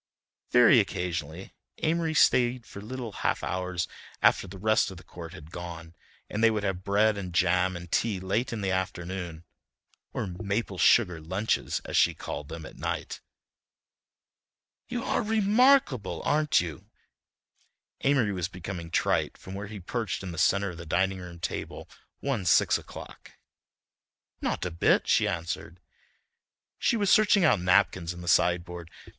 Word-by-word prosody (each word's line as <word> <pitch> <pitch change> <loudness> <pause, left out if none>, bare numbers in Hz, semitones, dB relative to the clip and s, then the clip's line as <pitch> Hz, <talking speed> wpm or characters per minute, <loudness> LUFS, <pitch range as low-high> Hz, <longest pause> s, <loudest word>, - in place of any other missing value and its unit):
Very - - +7
occasionally 85 0 -3 0.3
Amory 160 0 +1
stayed 125 -4 +3
for 100 - -10
little 120 +1 -6
half - - -1
hours 90 -1 -2 0.3
after - - +3
the 95 +1 -9
rest 110 +3 +2
of 95 - -9
the 90 - -13
court 85 -2 -10
had 80 -3 -12
gone, 85 -2 -8 0.3
and 105 +2 -3
they 115 - +7
would 110 -2 -1
have 95 -2 -2
bread 105 +1 +2
and 90 -2 -6
jam 90 +1 +2
and 90 -1 -10
tea 105 -5 +1
late 100 +7 -1
in 115 -3 -4
the 95 -1 -1
afternoon 90 -2 -4 0.7
or - - -3
"maple 100 +1 -3
sugar 90 -9 +4
lunches," 95 +7 -1
as - - -5
she - - +4
called 75 - -6
them, 80 -1 -7
at - - -12
night. - - -4 1.7
"You 245 -1 -3
are - - 0
remarkable, 215 - +3
aren't 150 0 +3
you!" 80 -5 -7 1.1
Amory 130 -7 +2
was 90 -3 -2
becoming 90 -2 -7
trite - - 0
from 95 - -10
where 100 +1 -5
he 105 0 -8
perched 100 +2 -3
in 95 - -5
the 85 - -6
centre 100 -1 +2
of 85 - -11
the - - -6
dining 95 +3 +1
room 90 -1 -9
table 80 - -5 0.3
one 130 -9 -2
six - - +4
o'clock. - - -12 1.1
"Not - - -2
a 90 - -3
bit," 85 - +2
she - - +3
answered. 85 +1 -4 1.0
She 235 - +2
was 205 -3 +2
searching 205 -3 +5
out 105 - +4
napkins 90 -2 +2
in 90 - -9
the 85 - -9
sideboard. 85 -1 +1
95 Hz, 155 wpm, -28 LUFS, 85-110 Hz, 1.7 s, Very